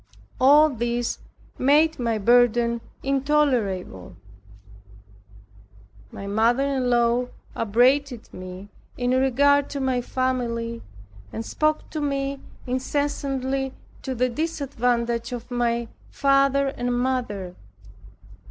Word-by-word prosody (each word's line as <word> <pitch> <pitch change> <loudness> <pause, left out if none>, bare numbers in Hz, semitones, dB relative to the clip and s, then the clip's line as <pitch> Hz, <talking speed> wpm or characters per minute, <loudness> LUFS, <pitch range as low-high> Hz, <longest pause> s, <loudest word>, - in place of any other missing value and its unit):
All 295 +4 +6
this 240 -1 -2 0.4
made 300 +4 +3
my 230 -2 0
burden 235 +1 +3 0.2
intolerable. 255 - 0 2.0
My 200 - -8
mother 225 +6 +2
in 270 -3 0
law 240 +1 +2 0.3
upbraided 245 +3 +1
me 185 +2 -9 0.3
in 245 0 0
regard 275 +2 +3
to 280 - -4
my 260 -2 0
family, 235 -2 -2 0.5
and 225 - -5
spoke 305 +4 0
to 310 - -3
me 275 -1 -2 0.3
incessantly 270 0 -2 0.3
to 260 - -4
the 250 +1 +2
disadvantage 245 -5 -1
of 245 +1 -7
my 235 -1 0 0.2
father 275 0 +2
and 245 -2 -2
mother. 240 -8 -2
250 Hz, 95 wpm, -24 LUFS, 235-275 Hz, 2.0 s, All